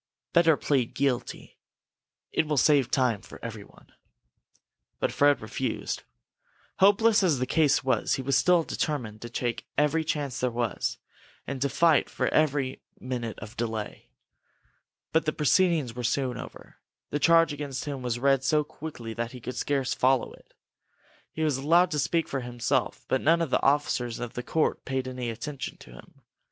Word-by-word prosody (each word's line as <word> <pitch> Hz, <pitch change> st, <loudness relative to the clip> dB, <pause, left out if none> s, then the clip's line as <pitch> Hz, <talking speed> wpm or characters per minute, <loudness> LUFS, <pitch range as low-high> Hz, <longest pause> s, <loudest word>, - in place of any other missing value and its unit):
Better 165 Hz, -3 st, +5 dB
plead 130 Hz, -5 st, 0 dB
guilty. 135 Hz, -3 st, -2 dB, 0.7 s
It 160 Hz, -, +1 dB
will 150 Hz, -1 st, 0 dB
save 140 Hz, -1 st, +4 dB
time 125 Hz, -6 st, +1 dB
for -, -, -12 dB
everyone." 110 Hz, -3 st, -10 dB, 1.1 s
But -, -, 0 dB
Fred 145 Hz, -2 st, +3 dB
refused. 110 Hz, +2 st, -3 dB, 0.8 s
Hopeless 210 Hz, +3 st, +5 dB
as 170 Hz, -7 st, +3 dB
the 125 Hz, -, -1 dB
case 150 Hz, 0 st, +2 dB
was, 130 Hz, -, +1 dB
he 135 Hz, -, -4 dB
was 135 Hz, 0 st, +1 dB
still 175 Hz, +4 st, +4 dB
determined 120 Hz, -10 st, -3 dB
to 120 Hz, -, -7 dB
take 120 Hz, 0 st, -3 dB
every 150 Hz, +3 st, +2 dB
chance 145 Hz, -4 st, -2 dB
there 125 Hz, -, +1 dB
was, 115 Hz, -4 st, -2 dB, 0.5 s
and 135 Hz, -2 st, -5 dB
to 140 Hz, -, +1 dB
fight 160 Hz, +3 st, +3 dB
for -, -, -1 dB
every 140 Hz, -4 st, +1 dB, 0.2 s
minute 120 Hz, -4 st, -4 dB
of 105 Hz, +3 st, -9 dB
delay. 110 Hz, -2 st, -4 dB, 1.0 s
But 160 Hz, +1 st, +2 dB
the 155 Hz, -, 0 dB
proceedings 155 Hz, -4 st, +2 dB
were 125 Hz, -, -5 dB
soon 125 Hz, +1 st, 0 dB
over. -, -, -11 dB, 0.3 s
The 145 Hz, -, -1 dB
charge 165 Hz, 0 st, +5 dB
against 140 Hz, -2 st, -5 dB
him 140 Hz, -3 st, -4 dB
was 120 Hz, -2 st, -2 dB
read 135 Hz, +1 st, +2 dB
so 150 Hz, +3 st, +2 dB
quickly 145 Hz, -7 st, -8 dB
that 115 Hz, +2 st, -4 dB
he 125 Hz, -, -8 dB
could 125 Hz, +2 st, -6 dB
scarcely 135 Hz, -2 st, -1 dB
follow 130 Hz, -1 st, +2 dB
it. -, -, -20 dB, 0.8 s
He 160 Hz, -, -3 dB
was 150 Hz, -4 st, +1 dB
allowed 170 Hz, +6 st, +3 dB
to 150 Hz, -, 0 dB
speak 160 Hz, +5 st, 0 dB
for 135 Hz, -, -2 dB
himself, 120 Hz, -2 st, -2 dB
but 130 Hz, -, +1 dB
none 165 Hz, +2 st, +4 dB
of 165 Hz, -5 st, -2 dB
the -, -, +2 dB
officers 135 Hz, -4 st, +1 dB
of 120 Hz, -1 st, -5 dB
the 125 Hz, -, -4 dB
court 155 Hz, +5 st, 0 dB
paid 130 Hz, -1 st, -2 dB
any 125 Hz, -2 st, -4 dB
attention 135 Hz, +5 st, -6 dB
to -, -, -15 dB
him. -, -, -16 dB
135 Hz, 170 wpm, -27 LUFS, 120-150 Hz, 1.1 s, Better